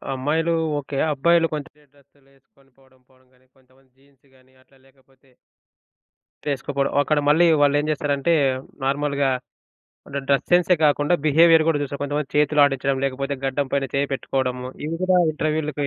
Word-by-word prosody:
అమ్మాయిలు 160 +5 -1 0.3
ఓకే. 140 0 -7 0.2
అబ్బాయిలు 165 +4 +2
కొంతే 150 -2 -6 0.2
డ్రెస్సులేసుకొని 135 -1 -29
పోవడం, 130 -1 -27
పోవడం 130 0 -28
గాని, 130 0 -31
కొంతమంది 130 0 -29
జీన్స్ 140 0 -30
గాని, 130 0 -27
అట్లా 135 +1 -28
లేకపోతే... 135 0 -29 1.2
తేసుకోపోవడం. 140 0 -2
అక్కడ 150 +1 +1
మళ్ళీ 160 +4 +4 0.2
వాళ్ళేం 145 +1 +2
చేస్తారంటే 145 +1 0 0.5
నార్మల్‌గా 140 0 0 0.8
అంటే 140 0 -5
డ్రెస్ 140 -1 +2
సెన్సే 180 +1 +4
కాకుండా, 145 +2 +2
బిహేవియర్ 160 +2 +5
గూడా 160 -3 +1
చూస్తారు. 140 0 -5
కొంతమంది 145 0 -3
చేతులాడిచ్చడం, 145 -2 +2
లేకపోతే 135 +1 -2
గడ్డం 135 +1 -1
పైన 140 -1 0
చేయి 140 +1 0
పెట్టుకోవడము, 125 -1 -3 0.2
ఇవి 160 - -3
కూడా 185 0 +3 0.2
ఇంటర్‌వ్యూ‌లకి 150 -2 -2
140 Hz, 135 wpm, -22 LUFS, 135-150 Hz, 1.2 s, బిహేవియర్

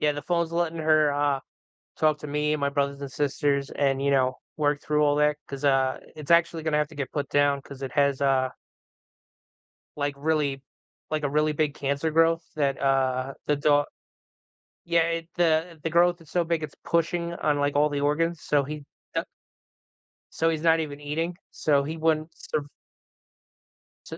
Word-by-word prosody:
yeah, 150 -1 +2
the 145 - -6
phone's 170 -1 0
letting 170 -1 -1
her, 155 -2 +3
uh, 145 -1 +1 0.6
talk 155 -1 +3
to - - -6
me 150 +1 0
and 150 - -1
my 140 - +1
brothers 140 0 -1
and 140 -1 -6
sisters 140 0 0
and, 135 -1 0
you 140 - +2
know, 130 -2 +2 0.2
work 145 -1 +1
through 150 0 +2
all 145 0 +3
that 150 0 +3
'cause, 140 +1 -7
uh, 135 -1 +2 0.2
it's 155 +1 -9
actually 170 -1 +3
gonna 155 -2 +1
have 150 - 0
to 155 - -14
get 140 -2 -4
put 145 -2 -2
down 145 -1 +2
'cause 140 -1 -11
it 130 -2 -4
has, 140 -2 +2
uh 135 -2 +2 1.5
like 145 -1 -1
really 145 -2 0 0.5
like, 155 -1 -1
a 145 - +1
really 150 +1 +1
big 150 -1 0
cancer 140 +3 -1
growth 165 +1 +3
that, 140 -3 0
uh, 135 -1 +1
the 150 - +3
do 145 0 +3 1.0
yeah, 170 0 +3 0.2
it, 165 - -29
uh 165 0 +2
the 165 - -1
growth 175 +1 +3
is 160 - -17
so 175 -1 +1
big, 165 -1 -1
it's 150 -2 -6
pushing 170 +1 0
on, 150 -3 0
like, 145 0 0
all 150 +1 +4
the 145 -1 -2
organs, 165 +3 0
so, 145 -1 +2
he 150 +1 -7 0.3
da - - 0 1.1
so, 165 - +1
he's 160 -2 -1
not 165 0 +4
even 145 -2 -5
eating. 165 +4 -2 0.2
So, 145 -2 +2
he 155 +3 -5
wouldn't 155 0 +1
surv 145 -1 -4 1.4
su - - -8
150 Hz, 185 wpm, -26 LUFS, 140-160 Hz, 1.5 s, all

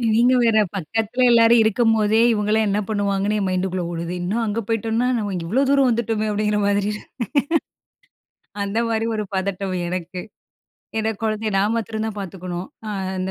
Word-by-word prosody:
நீங்க 245 +2 +4
வேற, 225 -2 +3 0.2
பக்கத்துல 220 +7 -2
எல்லாரும் 230 0 +6
இருக்கும்போதே, 220 -1 +3
"இவங்கெல்லாம் 215 0 +1
என்ன 200 +1 +1
பண்ணுவாங்கன்னு?" 205 0 0
என் 195 - -1
மைண்ட்டுகுள்ள 185 0 -1
ஓடுது. 170 +1 -4
இன்னும் 215 +6 -1
அங்க 215 +2 -1
போய்ட்டோம்ன்னா, 225 +2 0
"நாம 205 -2 -2
இங்க 175 -2 -3
இவ்வளவு 265 +9 +2
தூரம் 275 -2 +4
வந்துட்டோமே!" 225 -2 0
அப்படின்ற 210 0 0
மாரி 205 0 +2
இருக்கும். 210 - -8 1.6
அந்த 200 +3 -1
மாதிரி 225 0 0
ஒரு 210 - -1
பதட்டம் 190 0 -2
எனக்கு. 180 0 -4 0.8
ஏன்னா 220 0 0
குழந்தைய 215 0 -1
நான் 205 +3 +2
மாத்திரம் 220 0 -3
தான் 215 - -5
பாத்துக்கணும். 180 -1 -6 0.2
அ - - -4 0.3
அந்த 185 +1 -2
210 Hz, 160 wpm, -22 LUFS, 195-225 Hz, 1.6 s, எல்லாரும்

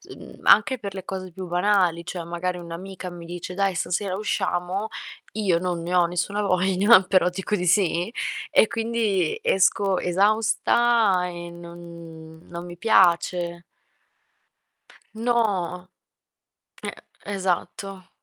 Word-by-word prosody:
mhmm, - - -13
anche 255 +4 +5
per 200 -3 -6
le 190 -2 -7
cose 185 -2 -6
più 185 +1 -7
banali. 175 -2 +1
Cioè 175 -2 -5
magari 175 +2 -3
un'amica 180 +2 -7
mi 175 -1 -10
dice: 175 +1 -7
"Dai, 195 -1 0
stasera 185 +2 -1
usciamo", 190 -1 -2 0.5
io 190 -6 +1
non 175 -2 -2
ne 175 +2 -4
ho 180 -1 +5
nessuna 180 +4 -2
voglia, 190 +2 +4
però 185 -1 +3
dico 190 +3 -2
di 180 - -2
sì 175 +1 +2 0.4
e 220 - +5
quindi 225 -6 0
esco 190 0 +2
esausta 215 +1 +2
e 175 -1 -7
non 170 -2 -11
non 170 0 -7
mi 175 -1 -9
piace. 175 -3 +2 1.5
No. 205 -6 -1 0.9
Eh, - - -4 0.3
esatto. 195 0 -3
185 Hz, 120 wpm, -24 LUFS, 175-200 Hz, 1.5 s, anche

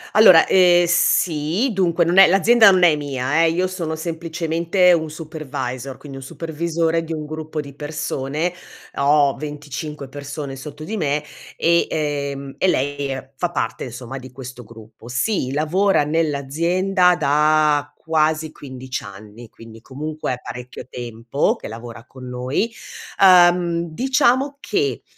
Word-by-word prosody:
Allora, 185 -6 +8
ehm, 175 -2 +5
sì, 170 - +1
dunque 175 -3 +1
non 175 +3 +3
è 195 - +9
l'azienda 220 +4 +6
non 185 -2 +3
è 165 -3 +6
mia, 145 +1 -1
eh, - - +3
io 180 +3 0
sono 175 -4 -4
semplicemente 165 +2 +1
un 160 -2 0
supervisor, 145 -5 -6
quindi 140 -2 -10
un - - -10
supervisore 165 +2 -2
di 165 - -5
un 155 -1 -5
gruppo 155 0 -6
di 140 -1 -6
persone. 150 +2 -3 0.4
Ho 140 -1 +3
25 150 -1 -7
persone 145 0 -7
sotto 145 +3 -9
di 220 +8 -4
me, 150 -4 -1 0.3
e, 170 0 +2
ehm 140 -3 -3
e - - +2
lei, 145 -4 0
ehm, 135 0 -6
fa 175 +6 -2
parte - - -3
insomma 125 +2 -7
di 130 0 -12
questo 125 -1 -10
gruppo. 110 0 -15
Sì, 130 - -1
lavora 160 +5 +2
nell'azienda 165 +5 +1
da 150 -1 +2 0.2
quasi 155 -1 0
15 130 -3 -7
anni, 105 +4 -12
quindi 115 0 -14
comunque 150 +3 -5
è 125 - -4
parecchio 125 +1 -8
tempo 120 +2 -2
che - - -9
lavora 115 +1 -9
con 130 0 -12
noi. 125 - -2 0.5
Ehm, 175 -2 +5
diciamo 265 - +1
che, 420 +4 -2
155 Hz, 145 wpm, -20 LUFS, 135-170 Hz, 0.5 s, è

